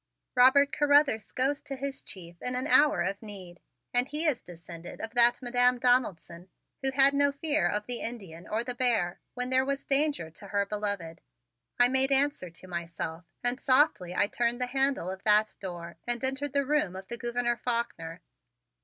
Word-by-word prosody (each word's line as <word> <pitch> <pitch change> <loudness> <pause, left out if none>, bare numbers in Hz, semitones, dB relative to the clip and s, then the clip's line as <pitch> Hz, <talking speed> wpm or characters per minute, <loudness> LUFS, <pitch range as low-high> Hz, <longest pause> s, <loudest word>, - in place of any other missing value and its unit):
"Robert 265 +3 +6
Carruthers 285 -6 +3
goes 275 +3 0
to 280 -2 -6
his 275 0 -4
chief 175 -2 -11
in 250 0 -3
an 255 +2 -2
hour 290 - +4
of 195 +2 -3
need 190 -5 -9 0.3
and 245 +1 +2
he 300 +3 -1
is 295 -7 +1
descended 170 0 -11
of 225 - -5
that 240 +1 +4
Madam 245 0 +3
Donaldson 195 -8 0 0.3
who 270 - +1
had 270 +1 +4
no 285 0 +3
fear 300 +2 0
of 210 0 -2
the 245 0 -2
Indian 195 -8 -7
or 220 +2 -1
the 250 +1 -4
bear 235 -8 0 0.2
when 250 0 -3
there 260 0 +4
was 275 +1 -3
danger 280 - 0
to 200 +5 -12
her 200 +1 0
beloved," 200 -5 -4 0.6
I 245 - +6
made 265 +2 +1
answer 275 -8 +1
to 170 +3 -12
myself 170 -1 -5 0.2
and 245 +1 0
softly 255 - +2
I 200 - +3
turned 235 +3 -1
the 250 - 0
handle 270 -7 0
of 190 +1 -8
that 215 0 +3
door 175 -3 -7
and 240 +1 -2
entered 270 +1 -2
the 280 -1 +1
room 290 -10 0
of 190 0 -8
the 235 - -5
Gouverneur 240 0 -1
Faulkner. 205 -10 -3
240 Hz, 185 wpm, -29 LUFS, 190-270 Hz, 0.6 s, Robert